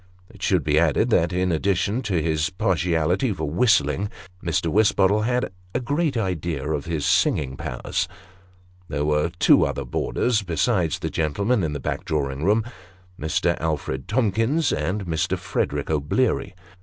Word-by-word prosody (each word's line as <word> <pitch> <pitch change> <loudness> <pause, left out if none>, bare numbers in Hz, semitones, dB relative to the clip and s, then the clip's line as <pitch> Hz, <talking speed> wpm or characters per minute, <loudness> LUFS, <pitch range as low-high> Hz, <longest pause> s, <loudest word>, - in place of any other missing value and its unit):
It - - -16
should - - +2
be 75 0 +3
added, 85 - +2
that, 85 -5 +3
in 90 0 0
addition 100 +7 0
to 90 -4 +1
his 80 +1 0
partiality 90 +3 +1
for 80 -5 -3
whistling, 90 - +2 0.3
Mr. 85 -2 0
Wisbottle 105 0 +3
had 125 -3 0 0.2
a - - +2
great 145 +2 0
idea 85 -8 -2
of 75 -2 -2
his 80 -3 -2
singing 65 -3 +2
powers. - - -3 0.8
There 75 -1 -2
were 75 +2 +1
two - - +5
other - - -2
boarders, 120 -3 0
besides 85 -5 0
the - - -4
gentleman 100 +8 0
in 75 -2 -1
the 75 - -4
back - - -3
drawing 70 -2 -2
room 105 +5 +3 0.6
Mr. 80 +2 +1
Alfred 75 -4 -2
Tomkins 115 - +1
and 95 +7 -2
Mr. 80 -2 -1
Frederick - - -2
O'Bleary. 80 - 0
85 Hz, 150 wpm, -23 LUFS, 75-105 Hz, 0.8 s, two